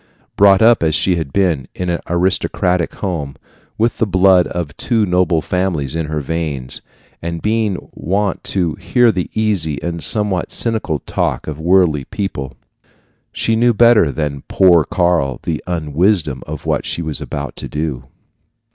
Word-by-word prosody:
Brought 100 Hz, +1 st, +5 dB
up 115 Hz, 0 st, +5 dB
as 80 Hz, -1 st, +1 dB
she 90 Hz, +2 st, +2 dB
had 80 Hz, -5 st, -4 dB
been, 85 Hz, -7 st, 0 dB
in 90 Hz, -1 st, -2 dB
an 85 Hz, -, -1 dB
aristocratic 90 Hz, 0 st, 0 dB
home, 80 Hz, -8 st, -4 dB, 0.4 s
with 115 Hz, +2 st, 0 dB
the 115 Hz, -, +2 dB
blood 95 Hz, -1 st, +4 dB
of 85 Hz, -5 st, -5 dB
two 115 Hz, -4 st, +1 dB
noble 90 Hz, -3 st, +2 dB
families 90 Hz, -7 st, -1 dB
in 80 Hz, -2 st, -2 dB
her 75 Hz, 0 st, -2 dB
veins, 70 Hz, -4 st, -3 dB, 0.4 s
and 85 Hz, 0 st, -4 dB
being 105 Hz, -1 st, 0 dB, 0.2 s
wont 95 Hz, +6 st, -1 dB
to 90 Hz, -5 st, 0 dB
hear 120 Hz, -2 st, +3 dB
the 90 Hz, -4 st, -3 dB
easy 95 Hz, -9 st, 0 dB
and 85 Hz, -1 st, -3 dB
somewhat 105 Hz, -5 st, +1 dB
cynical 110 Hz, -9 st, 0 dB
talk -, -, -1 dB
of 75 Hz, -1 st, -6 dB
worldly 85 Hz, -5 st, +2 dB
people, 70 Hz, -10 st, -5 dB, 0.8 s
she 115 Hz, -, 0 dB
knew 120 Hz, 0 st, +3 dB
better 115 Hz, -8 st, +5 dB
than 75 Hz, -2 st, -3 dB
poor 90 Hz, -4 st, +5 dB
Karl 85 Hz, -7 st, 0 dB
the 80 Hz, -2 st, -3 dB
un 80 Hz, -5 st, -3 dB
wisdom 80 Hz, -, +1 dB
of 75 Hz, -1 st, -7 dB
what -, -, 0 dB
she 85 Hz, -, -3 dB
was 80 Hz, -2 st, -3 dB
about 70 Hz, 0 st, -5 dB
to -, -, -6 dB
do. 75 Hz, -5 st, -4 dB
85 Hz, 160 wpm, -17 LUFS, 75-100 Hz, 0.8 s, Brought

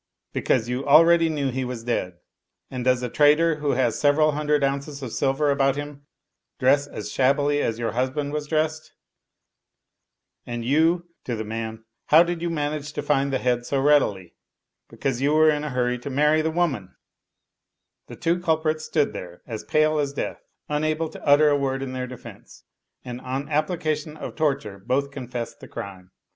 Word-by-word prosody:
Because 120 Hz, -3 st, +1 dB
you 125 Hz, +2 st, -2 dB
al 155 Hz, +4 st, +8 dB
ready 170 Hz, -1 st, +4 dB
knew 145 Hz, -4 st, -1 dB
he 130 Hz, +1 st, -2 dB
was 125 Hz, -2 st, -5 dB
dead. 90 Hz, -7 st, -2 dB, 0.5 s
And 130 Hz, -2 st, -4 dB
does 125 Hz, 0 st, +2 dB
a -, -, 0 dB
trader 150 Hz, +5 st, +4 dB
who 150 Hz, -2 st, 0 dB
has 125 Hz, -3 st, +1 dB
sev 145 Hz, -1 st, +4 dB
eral 155 Hz, 0 st, +3 dB
hundred 150 Hz, 0 st, +1 dB
ounces 140 Hz, +1 st, -2 dB
of 120 Hz, -, -6 dB
silver 140 Hz, +2 st, +1 dB
about 135 Hz, -1 st, +2 dB
him 145 Hz, 0 st, -7 dB, 0.5 s
dress 140 Hz, +2 st, +3 dB
as -, -, -7 dB
shabbily 145 Hz, +2 st, +2 dB
as 115 Hz, -, -1 dB
your 115 Hz, -2 st, -2 dB
husband 130 Hz, +5 st, -2 dB
was 150 Hz, -1 st, -3 dB
dressed? 155 Hz, 0 st, -1 dB, 1.5 s
And 120 Hz, -1 st, -5 dB
you 165 Hz, +6 st, +2 dB, 0.2 s
[to 120 Hz, -, -2 dB
the 110 Hz, -, -4 dB
man], 110 Hz, 0 st, -5 dB, 0.2 s
how 160 Hz, +3 st, +7 dB
did 175 Hz, -1 st, -3 dB
you 170 Hz, -, -1 dB
manage 150 Hz, -2 st, -3 dB
to -, -, -4 dB
find 140 Hz, -1 st, +1 dB
the 135 Hz, -, +1 dB
head 125 Hz, -1 st, -1 dB
so 140 Hz, -, 0 dB
readily? 135 Hz, -11 st, +2 dB, 0.6 s
Because 135 Hz, -3 st, -3 dB
you 145 Hz, +2 st, +2 dB
were 155 Hz, 0 st, +6 dB
in 150 Hz, 0 st, -2 dB
a 150 Hz, -, -3 dB
hurry 125 Hz, -1 st, 0 dB
to 125 Hz, -, -6 dB
marry 150 Hz, +3 st, +3 dB
the 160 Hz, -, 0 dB
woman/* 150 Hz, -, -1 dB, 1.1 s
The -, -, -9 dB
two 170 Hz, +2 st, 0 dB
culprits 155 Hz, -2 st, 0 dB
stood 150 Hz, -2 st, 0 dB
there 90 Hz, -1 st, -9 dB
as 110 Hz, -3 st, -6 dB
pale 155 Hz, 0 st, +2 dB
as 140 Hz, -1 st, -1 dB
death, -, -, -4 dB, 0.3 s
unable 155 Hz, +2 st, -1 dB
to -, -, -12 dB
utter 145 Hz, +1 st, +5 dB
a 145 Hz, -, +3 dB
word 135 Hz, -1 st, -1 dB
in 130 Hz, -, -5 dB
tfieir 130 Hz, -1 st, -4 dB
defense; 125 Hz, -, -12 dB, 0.4 s
and 125 Hz, 0 st, -6 dB
on 130 Hz, +2 st, -3 dB
the 150 Hz, -, -14 dB
application 155 Hz, 0 st, -1 dB
of -, -, -7 dB
torture 135 Hz, -10 st, -1 dB
both 140 Hz, +7 st, -1 dB
confessed 125 Hz, -4 st, -6 dB
the -, -, -11 dB
crime. 95 Hz, -2 st, -8 dB
140 Hz, 185 wpm, -24 LUFS, 125-155 Hz, 1.5 s, al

